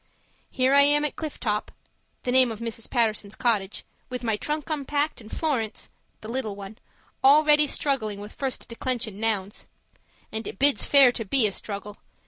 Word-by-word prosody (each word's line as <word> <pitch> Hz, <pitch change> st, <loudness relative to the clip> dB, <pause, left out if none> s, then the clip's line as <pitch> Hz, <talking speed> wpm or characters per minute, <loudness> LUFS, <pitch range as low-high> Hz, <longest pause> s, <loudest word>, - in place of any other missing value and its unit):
Here 260 Hz, 0 st, +1 dB
I 280 Hz, -, +7 dB
am 295 Hz, +1 st, +4 dB
at 295 Hz, -, -3 dB
Cliff 310 Hz, -2 st, -6 dB
Top 210 Hz, -3 st, -2 dB, 0.5 s
(the 250 Hz, -, -1 dB
name 255 Hz, -1 st, +5 dB
of 220 Hz, -, -6 dB
Mrs. 230 Hz, 0 st, -5 dB
Paterson's 215 Hz, -4 st, 0 dB
cottage) 215 Hz, -5 st, -1 dB, 0.2 s
with 250 Hz, 0 st, -5 dB
my 225 Hz, -2 st, +1 dB
trunk 300 Hz, +7 st, -3 dB
unpacked 290 Hz, -1 st, -1 dB
and 215 Hz, -, -13 dB
Florence 235 Hz, -9 st, -2 dB, 0.3 s
(the 215 Hz, -, -9 dB
little 230 Hz, -3 st, -3 dB
one) 200 Hz, +2 st, -10 dB, 0.4 s
already 300 Hz, +2 st, +6 dB
struggling 250 Hz, -8 st, -1 dB
with 205 Hz, +1 st, -9 dB
first 270 Hz, -2 st, -4 dB
declension 230 Hz, -3 st, -3 dB
nouns. 210 Hz, -3 st, -2 dB, 0.6 s
And 220 Hz, +1 st, -4 dB
it -, -, -7 dB
bids 285 Hz, +3 st, +4 dB
fair 275 Hz, -3 st, +7 dB
to 235 Hz, -, -4 dB
be 235 Hz, +3 st, +3 dB
a 210 Hz, -, +1 dB
struggle! 205 Hz, +1 st, -6 dB
240 Hz, 170 wpm, -25 LUFS, 215-280 Hz, 0.6 s, I